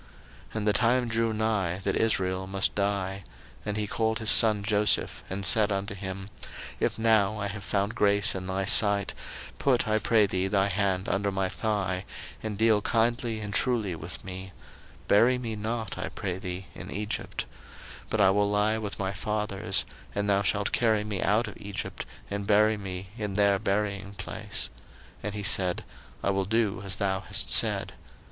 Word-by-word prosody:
01:047:029 - - -19
And 105 -1 -2
the 105 - +4
time 120 +2 +2
drew 115 0 +1
nigh 105 -5 0
that 100 - 0
Israel 95 -4 0
must 95 0 +1
die: 100 -1 -1 0.4
and 105 0 -3
he 105 - 0
called 110 +1 0
his 110 -1 +3
son 110 -4 +5
Joseph, 105 0 +1
and 100 +1 -2
said 105 -1 +7
unto 100 +1 -2
him, 95 0 -6 0.5
If - - 0
now 110 -2 +3
I 105 -1 -2
have 100 0 -7
found 100 +3 -1
grace 100 0 +3
in 95 -1 -5
thy 95 0 -1
sight, 100 0 +3 0.5
put, 130 -5 +2
I 110 0 +2
pray 110 -1 +4
thee, 95 -1 -1
thy 100 0 +2
hand 95 -1 0
under 100 +1 0
my 95 -1 -1
thigh, 95 -4 -2 0.4
and 110 -2 -4
deal 110 -1 +4
kindly 115 0 0
and 105 -1 -5
truly 110 -6 +1
with 80 - -7
me; 95 0 -7 0.5
bury 120 +5 +5
me 115 -3 -4
not, 110 0 -4
I - - -3
pray 95 -2 -4
thee, 90 -1 -5
in - - -9
Egypt: 105 +1 -3 0.6
01:047:030 - - -26
But 110 - +1
I 95 -1 +6
will 100 +1 +2
lie 105 +2 +2
with 105 -2 -5
my 95 0 -2
fathers, 100 -1 -1 0.3
and 100 0 -1
thou 100 -1 +3
shalt 100 0 0
carry 110 -3 +2
me 105 -3 -3
out 110 +4 +2
of - - -9
Egypt, 100 -2 -6 0.2
and 100 0 -3
bury 110 +1 +4
me 95 -2 -6
in 105 -2 -3
their 100 -1 +3
buryingplace. 100 -1 -3 0.5
And 105 0 -4
he 105 - -4
said, 90 -2 +1 0.4
I 100 - +2
will 95 0 0
do 110 -1 0
as 95 -1 -2
thou 95 -2 0
hast - - 0
said. - - +4
100 Hz, 180 wpm, -27 LUFS, 95-110 Hz, 0.6 s, said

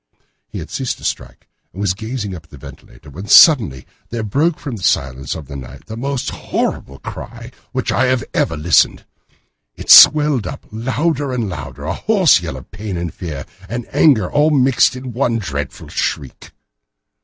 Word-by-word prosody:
He - - -8
had - - -8
ceased - - -3
to - - -16
strike - - -5 0.2
and 95 - -11
was 100 -3 +1
gazing 110 0 -5
up 80 -3 -9
at - - -27
the 70 - -13
ventilator 70 +2 -14
when 95 +9 -9
suddenly 105 - +6 0.2
there 115 -1 -4
broke 150 - 0
from 135 -5 -6
the - - -11
silence 65 -4 -1
of 80 -3 -8
the 70 - -9
night 65 0 -10
the 110 - -8
most 135 +2 -3
horrible 70 - -3
cry - - -9
to - - -28
which - - -2
I 130 - +2
have 130 -1 +1
ever 80 - 0
listened. 75 -1 +2 0.7
It - - -1
swelled 150 -6 +7
up - - -8
louder 130 +6 -1
and 120 -4 -2
louder, 75 -5 -7
a 80 - -2
hoarse 190 - +3
yell 80 -6 -5
of 65 - -14
pain 105 -4 -6
and 85 -1 -4
fear 75 -6 -7 0.2
and 120 0 -4
anger 120 - +4
all 150 +1 +3
mingled 135 -4 +3
in 130 - -8
the 130 - -6
one 120 -1 0
dreadful 70 -9 -5
shriek. 65 - -4
110 Hz, 190 wpm, -18 LUFS, 80-130 Hz, 0.7 s, swelled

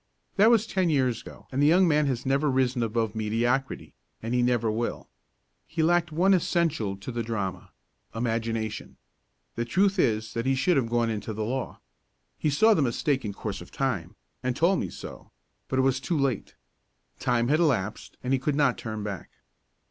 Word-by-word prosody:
That 210 +3 +6
was 230 -2 +4
ten 190 -5 0
years 130 -6 +1
ago - - -13
and 135 +2 0
the 145 - +5
young 180 +4 +5
man 150 -2 +3
has 130 -3 -2
never 140 +3 +2
risen 130 -2 +1
above 115 -1 -1
mediocrity 120 +5 -1 0.3
and 115 +2 -4
he 125 - +2
never 120 -2 +2
will. 115 +2 -3 0.6
He 160 0 -1
lacked 170 +1 +2
one 180 +5 +3
essential 160 - 0
to 100 +6 -7
the 120 0 -2
drama 105 -5 -4 0.5
imagination. 115 -2 -2 0.6
The 115 - -2
truth 190 - +1
is 110 -6 +1
that 115 +2 -2
he 135 - +3
should 175 +7 +2
have 125 -5 +1
gone 120 -1 +1
into 110 0 -4
the 110 0 -2
law. 130 +3 -4 0.6
He 155 - +1
saw 220 +11 +5
the 160 - +2
mistake 135 +2 0
in 105 -2 -4
course - - -5
of - - -11
time, - - -2 0.3
and 125 -1 -1
told 175 +6 +3
me 95 - -3
so, - - -10 0.4
but 130 - -2
it 130 - +3
was 130 -1 +2
too 165 +5 -1
late. 135 -5 -1 0.6
Time 120 -2 +1
had 155 +2 +3
elapsed 120 - 0
and 130 +1 0
he 135 - +2
could 140 +2 -1
not 140 -4 +2
turn 110 -2 -5
back. 100 -3 -5
130 Hz, 190 wpm, -27 LUFS, 115-150 Hz, 0.6 s, That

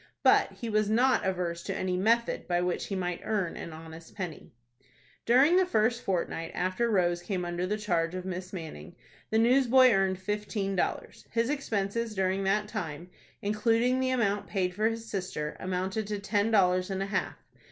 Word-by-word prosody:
But - - +4
he 235 - -6
was 215 -1 +1
not 245 -1 +3
averse 175 -2 -2
to - - -4
any 185 -1 -1
method 230 +5 +1
by 175 -1 +1
which 180 0 -1
he 195 - -3
might 180 -2 -2
earn 205 -6 -1
an 170 - -7
honest 160 +1 -11
penny. 180 -6 -6 0.8
During 270 +9 +6
the 375 - +4
first 230 -5 +1
fortnight 170 -3 -2
after 185 +6 0
Rose 175 -4 +2
came 180 0 -3
under 175 +1 -2
the 210 +2 -1
charge 175 -5 -1
of 185 0 -5
Miss 185 0 -5
Manning, 160 - -8 0.3
the 220 - +1
newsboy 255 +2 +5
earned 195 -2 +2
fifteen 205 0 -3
dollars. 180 - -3
His 230 +3 0
expenses 225 -4 -2
during 190 0 0
that 210 +2 +1
time, 175 -5 -5 0.3
including 230 +5 +2
the 260 0 +1
amount 215 -5 0
paid 185 -3 -1
for 215 +4 +1
his 225 0 -6
sister, 185 -7 -4
amounted 190 +3 -2
to 210 0 -2
ten 205 +1 0
dollars 185 -3 +3
and 195 0 -2
a 195 +1 -6
half. - - -1
195 Hz, 180 wpm, -29 LUFS, 180-225 Hz, 0.8 s, During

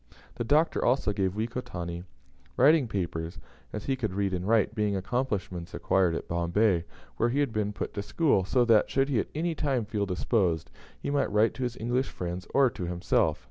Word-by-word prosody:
The - - -3
Doctor 150 +7 +2
also 125 -4 +2
gave 95 -1 -1
Wekotanti 90 -7 -4 0.5
writing 145 0 +5
paper 85 -5 -3 0.4
as 105 - -6
he 135 - +1
could 110 -7 -3
read 100 -1 0
and 90 +1 -2
write, 110 -1 +3
being 105 -2 0
accomplishments 95 -4 -3
acquired 90 -3 +2
at - - -5
Bombay, 85 +1 +1 0.3
where 120 - +2
he 135 +4 0
had 140 -6 0
been 105 -1 0
put 100 - -5
to 100 - -3
school 120 - +2
so 120 +6 +2
that, 115 -3 +4
should 135 +1 +1
he 130 -5 +2
at - - -2
any 165 +2 0
time 135 -7 -1
feel 105 -1 -2
disposed, 90 -2 0 0.3
he - - -3
might 140 -5 +1
write 105 +2 +3
to - - -8
his 125 -1 -2
English 125 +3 -1
friends, 90 +1 -5
or 135 -3 +4
to 90 - -5
himself. 85 0 +1
105 Hz, 195 wpm, -28 LUFS, 90-125 Hz, 0.5 s, writing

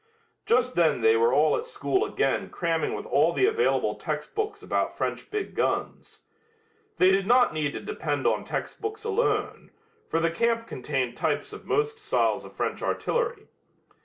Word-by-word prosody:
Just 250 +1 +3
then 160 -7 +2
they 110 0 +5
were 115 +1 +3
all 150 +4 +4
at 470 - -4
school 420 -4 0
again 425 - 0
cramming 165 -3 -1
with 410 - -6
all 480 - +3
the 390 - +3
available 445 +2 +2
textbooks 420 -1 -4
about - - -1
French - - -3
big 420 -1 -3
guns. - - -2 0.7
They 185 +1 +5
did 195 0 +1
not 245 -5 +5
need 150 -2 -1
to - - -5
depend 425 - -3
on - - +2
textbooks 430 0 -5
alone, 450 +2 -1 0.4
for 165 - +1
the 165 0 +1
camp 230 +5 0
contained 130 - -3
types - - -1
of - - -10
most 440 +1 0
styles 425 0 +1
of - - -11
French - - -3
artillery. 480 -3 -1
245 Hz, 160 wpm, -26 LUFS, -, 0.7 s, they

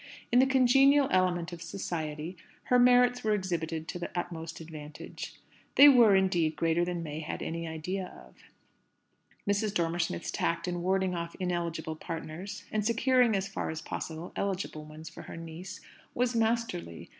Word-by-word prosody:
In 245 - +6
the 265 - +5
congenial 270 +2 +5
element 180 -2 +1
of 170 - -8
"society," 160 -3 -4 0.3
her 250 - +3
merits 245 0 +5
were 215 -1 +2
exhibited 165 -4 -3
to 175 - -4
the 175 - -4
utmost 165 -1 -4
advantage. 155 -2 -9 0.4
They 285 - +10
were, 235 -7 +7
indeed, 175 -5 +2
greater 165 +1 +2
than 175 -1 -2
May 155 -1 -5
had 160 - -5
any 165 0 -4
idea 180 +4 -4 0.2
of; - - -22 1.1
Mrs. 205 0 +1
Dormer 170 0 0
Smith's 170 0 -2
tact 170 - -1
in 175 -1 -2
warding 190 +1 +1
off 170 -1 -4
ineligible 170 -3 -2
partners, 165 +4 -6
and 215 -1 0
securing 235 +1 +3
as 195 0 -1
far 195 - -4
as 160 - -4
possible 160 +2 -6
eligible 185 -6 -3
ones 155 +1 -10
for - - -9
her - - -9
niece, 165 +3 -8 0.3
was 250 0 +1
masterly. 225 - -1
175 Hz, 160 wpm, -30 LUFS, 165-215 Hz, 1.1 s, They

